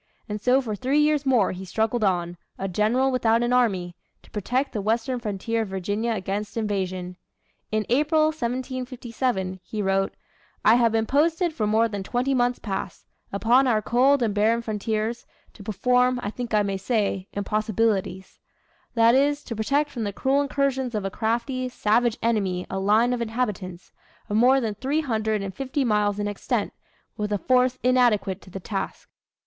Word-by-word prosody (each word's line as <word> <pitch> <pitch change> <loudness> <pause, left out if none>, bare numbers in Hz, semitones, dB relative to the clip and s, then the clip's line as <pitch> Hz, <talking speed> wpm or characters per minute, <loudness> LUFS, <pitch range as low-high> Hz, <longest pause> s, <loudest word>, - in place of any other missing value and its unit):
And 210 -1 -4
so 255 +4 +3
for 220 -5 -4
three 260 +6 0
years 300 -2 +2
more 245 -7 +3
he 185 +1 -7
struggled 220 +4 -1
on, 175 -3 0 0.2
a 195 - -3
general 220 +8 +1
without 230 -2 +2
an 240 +1 +1
army, 190 -8 +1 0.3
to - - -20
protect 250 +7 -1
the 210 - -2
western 230 +4 0
frontier 225 +1 -2
of 220 - -3
Virginia 205 +5 -2
against 205 +2 -4
invasion. 185 -4 -2 0.5
In 215 -1 0
April, 300 +5 +3
1757, 250 -6 -3
he 210 +4 -7
wrote: 195 0 0 0.5
"I 220 - +7
have 235 -1 +4
been 225 0 +1
posted 325 - +1
for 215 -8 -1
more 220 +2 +3
than 205 -3 -5
twenty 245 +7 -1
months 245 -1 +1
past, 195 -3 -5 0.3
upon 240 +6 +3
our 225 -3 +3
cold 255 +5 +3
and 215 -3 0
barren 225 +3 +2
frontiers, 220 +2 -2 0.3
to - - -14
perform, 250 +5 +2
I 205 - -2
think 240 -1 -3
I 210 - +4
may 195 -1 -2
say, 195 -2 -1
impossibilities; 210 -2 -1 0.6
that 230 0 +5
is, 285 +2 +2
to 230 - -6
protect 280 +7 0
from 235 - -4
the 205 - -2
cruel 270 +7 +1
incursions 270 -3 -1
of 205 -2 -2
a 195 - -2
crafty, 240 +4 -1
savage 235 0 +1
enemy 195 -6 0
a 190 - -2
line 215 +5 +3
of 245 - -2
inhabitants, 210 -6 -3 0.4
of 205 - -1
more 255 +4 +5
than 225 -4 -2
three 270 +8 -1
hundred 220 -6 -1
and 195 -1 -5
fifty 270 +6 -2
miles 210 -2 +1
in 205 0 -1
extent, 205 -1 -2 0.4
with 210 0 -2
a 205 - +2
force 255 +3 +2
inadequate 240 -6 +2
to - - -15
the 195 - -7
task." 195 +1 -5
225 Hz, 175 wpm, -24 LUFS, 205-250 Hz, 0.6 s, I